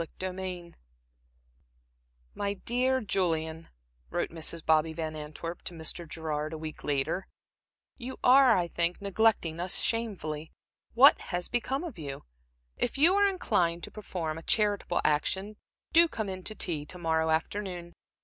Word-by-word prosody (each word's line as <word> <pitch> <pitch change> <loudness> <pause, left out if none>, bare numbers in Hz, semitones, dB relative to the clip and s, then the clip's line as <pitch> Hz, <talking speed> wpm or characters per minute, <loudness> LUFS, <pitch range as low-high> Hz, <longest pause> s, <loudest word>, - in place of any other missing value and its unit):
Chapter 185 +3 -5
XX 180 -2 -6 1.6
"My 200 0 -2
dear 255 +5 +1
Julian," 165 -6 -1 0.4
wrote - - -2
Mrs. 165 0 -3
Bobby 160 0 +3
Van 160 -1 -4
Antwerp 155 +3 -6
to 175 - -4
Mr. 165 +1 -2
Gerard 155 -1 -3
a - - -4
week 155 0 -7
later, 145 +6 -1 0.7
"you 260 +1 -6
are, 255 -3 +7
I 175 -1 +1
think, 170 +1 0
neglecting 200 -5 +1
us 180 +1 -1
shamefully. 175 -10 -2 0.4
What 270 +5 +8
has 175 -1 -2
become 265 +5 -1
of 330 - -7
you? 140 -3 -6 0.5
If 245 - 0
you 325 +6 +6
are 405 0 +5
inclined 175 - 0
to - - -7
perform 165 -7 -4
a - - -11
charitable 205 -2 +1
action, 190 +8 0 0.4
do 335 +1 +7
come 220 -9 -4
in 185 0 -5
to 215 - -3
tea 160 -8 0
to 180 - -8
morrow 160 -2 +1
afternoon. 175 +1 -2
175 Hz, 150 wpm, -29 LUFS, 160-215 Hz, 1.6 s, What